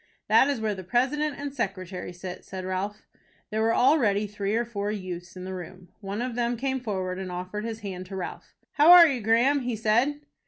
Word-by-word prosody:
"That 265 - +6
is 280 -4 -1
where 215 -1 -1
the 190 -1 -7
president 275 - 0
and 285 -1 -5
secretary 185 -7 -4
sit," 180 +1 -8
said 190 -1 -7
Ralph. 195 +3 -3 0.5
There 215 +1 0
were 225 +1 +2
already 240 -7 +3
three 205 0 -2
or 235 +1 +1
four 205 -3 -3
youths 180 -3 -6
in 180 - -7
the 190 0 -5
room. 180 0 -9
One 205 +2 -4
of 250 -1 -3
them 240 0 -1
came 265 +2 -1
forward 190 -6 -3
and 185 -1 -5
offered 185 +4 -5
his 225 -1 -5
hand 185 -3 -6
to 195 - -7
Ralph. 185 -2 -7 0.2
"How 305 +2 +5
are 350 -1 +11
you, 265 -5 -1
Graham?" 235 +6 +3
he 245 -3 -2
said. 235 +7 +1
210 Hz, 210 wpm, -26 LUFS, 185-245 Hz, 0.5 s, are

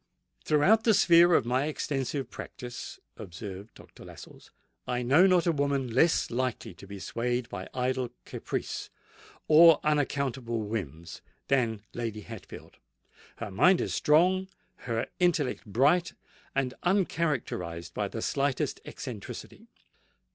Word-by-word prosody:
"Throughout 190 +9 +4
the 225 -2 +4
sphere 170 -1 +6
of - - +3
my 130 +4 +1
extensive 140 -2 -3
practice," 125 -2 -8 0.2
observed 95 +3 -9
Dr. - - -15
Lascelles, - - -13 0.4
"I 125 0 -1
know 145 +10 +5
not 180 -2 +3
a 170 - +3
woman 140 -4 -1
less 160 +4 +3
likely 125 -4 -2
to 95 +3 -14
be 100 0 -8
swayed 120 +4 -2
by - - -7
idle 125 -1 -1 0.2
caprice - - -5 0.6
or 160 0 +8
unaccountable 135 -5 -1
whims 85 -7 -6 0.3
than 115 -6 +1
Lady 115 -3 -4
Hatfield. 110 0 -11 0.6
Her 115 -3 -6
mind 180 - +4
is - - -2
strong—her 170 -8 0
intellect 160 -10 +1
bright 145 - +2 0.4
and 130 -2 0
uncharacterised 145 - -1
by 105 - -2
the 110 +3 -5
slightest 140 -2 -1
eccentricity. - - -8
130 Hz, 120 wpm, -28 LUFS, 115-155 Hz, 0.6 s, or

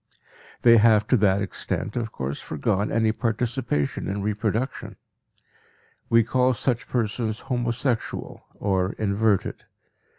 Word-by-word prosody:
They 115 -1 +8
have 110 -1 +5
to 130 - +5
that 100 -1 +3
extent, 100 +1 -3
of 115 -2 -2
course, 70 +1 -4
foregone 100 +7 -1
any 110 -1 +2
participation 115 - -1
in 100 0 -3
reproduction. 110 +4 -2 1.1
We 115 0 +5
call 125 +2 +2
such 120 +1 -1
persons 110 -1 -2
homosexual 120 0 -2 0.2
or 95 -1 0
inverted. 105 -1 0
110 Hz, 110 wpm, -24 LUFS, 100-120 Hz, 1.1 s, They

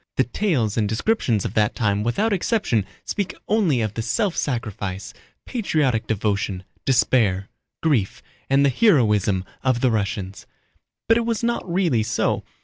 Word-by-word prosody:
The - - +3
tales 130 - -1
and 105 -2 +1
descriptions 115 - 0
of - - -3
that 105 -1 +1
time 105 -3 +1
without 200 - 0
exception 185 - 0 0.2
speak 200 -3 -3
only 190 - +2
of 110 -2 -2
the 115 - -3
self 185 - 0
sacrifice, 105 -5 -3 0.3
patriotic 150 - 0
devotion, 100 -3 -1 0.2
despair, 110 -7 +2 0.3
grief, 130 -12 0 0.3
and 135 +1 +4
the - - +4
heroism 105 - +3 0.2
of 130 -3 +1
the 130 - +3
Russians. 100 -2 -3 0.6
But 225 - +5
it 235 - 0
was 230 -1 -1
not 235 -6 -1
really 170 - +2
so. 110 +1 0
120 Hz, 145 wpm, -22 LUFS, 105-175 Hz, 0.6 s, But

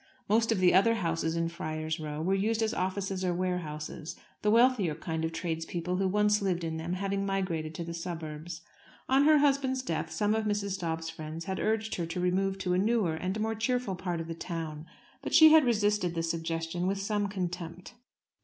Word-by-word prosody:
Most 225 +2 +3
of 225 - +2
the 185 -1 +4
other 230 +5 +5
houses 165 -4 -1
in 165 0 0
Friar's 160 -1 -4
Row 155 0 -4
were 190 +3 +1
used 220 +3 +1
as 220 - 0
offices 190 0 -2
or 180 -1 0
warehouses, 170 -3 -3 0.3
the 210 - +2
wealthier 230 -7 +4
kind 160 0 -4
of 160 - -1
tradespeople 170 +1 -3
who 190 0 +1
once 210 +2 +3
lived 180 -3 0
in 160 -1 -2
them 165 +2 -3
having 195 +1 -1
migrated 180 -5 -2
to 170 - -4
the 170 0 -6
suburbs. 165 -1 -6 0.5
On 270 +2 +4
her 310 0 +7
husband's 275 -2 +2
death - - -2
some 210 0 +1
of 220 0 0
Mrs. 200 -2 -1
Dobbs's 165 -2 -3
friends 160 +1 -7
had 190 -1 -3
urged 220 0 0
her 170 -2 -2
to 165 +2 -4
remove 190 +2 +1
to 185 -2 -1
a 180 - +2
newer 210 -4 +2
and 185 +6 -3
more 220 +1 0
cheerful 230 -1 -1
part 175 -2 -3
of 165 - -5
the 165 - -4
town, 165 -2 -5 0.3
but - - -1
she 315 0 +10
had 315 -3 +7
resisted 210 -6 +1
the 165 - -1
suggestion 165 +1 -2
with 195 +1 0
some 205 +1 0
contempt. 180 -1 -5
185 Hz, 200 wpm, -30 LUFS, 165-210 Hz, 0.5 s, she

